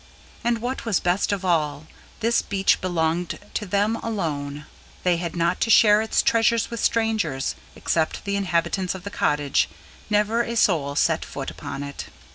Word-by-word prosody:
And, 235 -1 0
what 255 +2 -3
was 225 -6 +1
best 180 +4 +1
of 200 -2 -2
all, 155 -4 0 0.4
this 235 +1 +3
beach 195 -1 +1
belonged 170 -1 -1 0.2
to 210 - -3
them 205 +4 +1
alone; 150 -10 -3 0.4
they 180 -2 +3
had 170 0 -4
not 170 +1 0
to - - +1
share 210 -1 +6
its 220 - +1
treasures 230 0 +2
with 235 - -4
strangers; 215 -15 0 0.2
except 160 +3 -1
the 200 0 -1
inhabitants 185 0 0
of 185 - -9
the 200 - -6
cottage, 145 -6 +1 0.4
never 210 +2 +2
a 235 0 -3
soul 150 -10 +2
set - - +2
foot - - -6
upon 140 - -6
it. 140 0 -7
190 Hz, 165 wpm, -24 LUFS, 160-220 Hz, 0.4 s, share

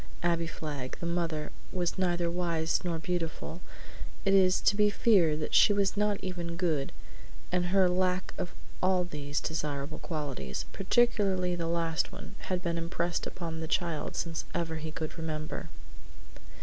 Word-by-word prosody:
Abbie 170 -1 +2
Flagg, 145 -5 -5
the - - -4
mother, 165 -3 -1 0.2
was 175 -2 0
neither 175 -2 +2
wise 170 -2 0
nor 170 -2 -1
beautiful; 170 -1 -3 0.6
it 195 - +4
is 185 -1 +6
to 205 - +4
be 210 0 +5
feared 175 -8 +4
that 150 - -3
she 205 - +7
was 200 -1 +2
not 210 0 +2
even 175 -2 -3
good, 160 -6 0 0.6
and 180 0 +2
her 190 0 +5
lack 185 +1 +1
of 180 -1 -3 0.3
all 185 -1 +3
these 145 -4 -3
desirable 150 -2 -3
qualities, 140 - -3
particularly 195 -4 +2
the 170 -1 -2
last 165 -1 0
one, 200 +1 -9 0.2
had 185 -1 0
been 170 -2 0
impressed 170 0 -1
upon 165 -2 -5
the 160 - -3
child 165 -2 0 0.4
ever 165 -1 -1
since 160 - -5
he 160 - -3
could 155 +1 -5
remember. 155 -1 -4
170 Hz, 155 wpm, -30 LUFS, 160-185 Hz, 0.6 s, she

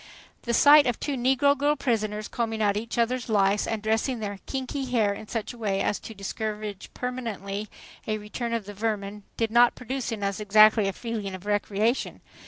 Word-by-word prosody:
The 235 - -2
sight 290 +1 +7
of 245 - -1
two 290 - -2
negro 265 +3 +3
girl 290 +1 +2
prisoners 215 -6 -1
combing 225 -2 -2
out 205 -2 +2
each 230 +3 -4
other's 240 +1 0
lice 200 -1 +2
and 220 -2 -3
dressing 225 +3 0
their 205 -2 -5
kinky 270 +1 -3
hair 225 -5 +1
in 210 +1 -9
such 225 +1 -4
a 240 - -14
way 200 -3 0
as 205 - 0
to 225 - -10
discourage 210 0 -5
permanently 215 -5 -4 0.4
a 215 -1 0
return 215 +3 -5
of 230 -3 -2
the 205 - -8
vermin 210 -1 -3 0.2
did 225 -1 0
not 240 +1 +5
produce 255 0 -4
in 215 -3 -4
us 200 0 -1
exactly 215 0 +5
a 195 - -1
feeling 215 -3 -4
of 185 +1 -11
"recreation." 210 +3 0
220 Hz, 190 wpm, -26 LUFS, 205-245 Hz, 0.4 s, sight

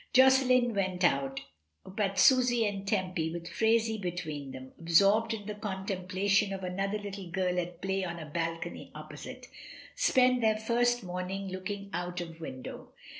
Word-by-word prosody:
Josselin 255 -2 +5
went 190 -2 -1
out, 135 -5 +1 0.4
but 195 0 -2
Susy 245 +1 +5
and 200 -1 -3
Tempy, 185 -5 0
with 170 0 -6
Phraisie 225 0 +1
between 160 -6 -4
them 130 0 -9
(ab 165 - -11
sorbed 200 +6 +5
in 215 -2 -4
the 210 - -4
contemplation 195 0 0
of 190 -1 -5
another 195 +3 -1
little 200 -3 -7
girl 180 0 0
at 175 -1 -6
play 195 0 0
on 170 -2 -4
a 160 - -7
balcony 165 +2 -4
opposite), 155 - -9 0.5
spent 255 -1 +3
their 220 -1 +3
first 240 +2 +1
morn 180 0 -4
ing 195 0 -4
looking 200 +2 -5
out 175 +1 -3
of 165 -1 -7
window. 130 -5 -8
195 Hz, 160 wpm, -30 LUFS, 175-215 Hz, 0.5 s, Josselin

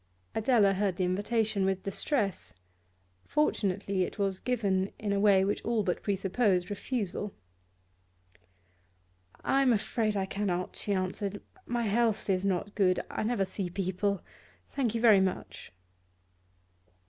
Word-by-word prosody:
Adela 220 -3 +4
heard 195 -1 0
the 185 - -1
invitation 205 +2 0
with 190 0 0
distress. 200 - -1 0.7
Fortunately 200 -9 0
it 180 - -2
was 195 -2 0
given 200 -6 0
in 205 -2 -2
a 200 - +1
way 200 -2 +5
which 205 - -1
all 230 -2 +1
but 180 -3 -1
presupposed 195 -1 +1
refusal. 205 -2 -3 2.1
'I 275 - +3
am 265 -2 +4
afraid 215 0 0
I 190 - 0
cannot,' 190 -2 -2
she 205 - -3
answered. 195 +1 -2 0.3
'My 240 0 -1
health 220 -1 +1
is 185 0 +1
not 195 +1 -1
good; 185 -3 +3
I - - -3
never 215 -3 +1
see 190 -1 -3
people. 190 +1 -1 0.4
Thank 240 -5 -1
you 230 - -1
very 215 -5 +7
much. 190 -1 -3
200 Hz, 135 wpm, -30 LUFS, 190-220 Hz, 2.1 s, very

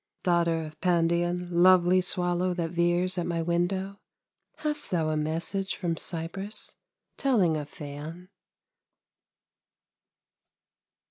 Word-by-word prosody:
Daughter 170 -2 +2
of 155 0 -12
Pandion, 175 0 +1
lovely 180 +1 +5
Swallow 180 0 -1
that 165 -2 -2
veers 175 +2 +1
at 175 - -2
my 170 -1 -1
window, 190 +4 -1 0.6
Hast 300 -1 -2
thou 165 -3 +1
a 155 - 0
message 165 +6 -2
from 170 -3 -2
Cyprus 190 +6 -2 0.4
Telling 210 - +3
of 150 -1 -4
Phaon? 155 +4 -8
175 Hz, 105 wpm, -28 LUFS, 165-185 Hz, 0.6 s, lovely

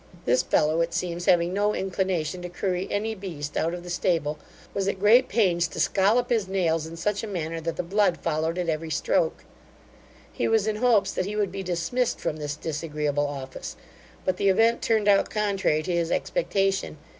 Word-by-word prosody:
This 125 +1 +3
fellow, 155 +2 +2
it 165 0 -1
seems, 175 0 -2
having 175 0 +4
no 205 +2 +1
inclination 185 -3 -1
to 180 - -6
curry 180 +1 -2
any 220 +2 -1
beast 165 -8 -6
out 165 +2 0
of 175 - -8
the 175 - -9
stable, 165 -4 0 0.3
was 195 -1 -1
at 195 - 0
great 230 +6 +5
pains 180 -6 +2
to 155 - -8
scollop 220 +6 +2
his 220 -5 +1
nails 165 -4 0
in 165 +1 -9
such 205 +4 -1
a 225 - -5
manner 165 -4 -3
that 165 +1 -3
the - - -2
blood 195 0 +2
followed 160 +1 -1
at 180 -1 -1
every 160 0 -2
stroke. - - 0 0.9
He - - -1
was 220 -2 +2
in 215 -1 -1
hopes 235 -3 +3
that 185 - -2
he 210 - -4
would 205 -3 0
be 195 +1 -5
dismissed 185 +8 -1
from 155 - -2
this 145 -1 -4
disagreeable 150 -2 -2
office, 135 -2 -7 0.5
but 185 -1 0
the 200 - +2
event 225 +4 +3
turned 220 -2 +1
out 200 -1 +4
contrary 195 -7 0
to 185 - -3
his 170 -1 0
expectation. 195 - 0
180 Hz, 195 wpm, -26 LUFS, 165-205 Hz, 0.9 s, great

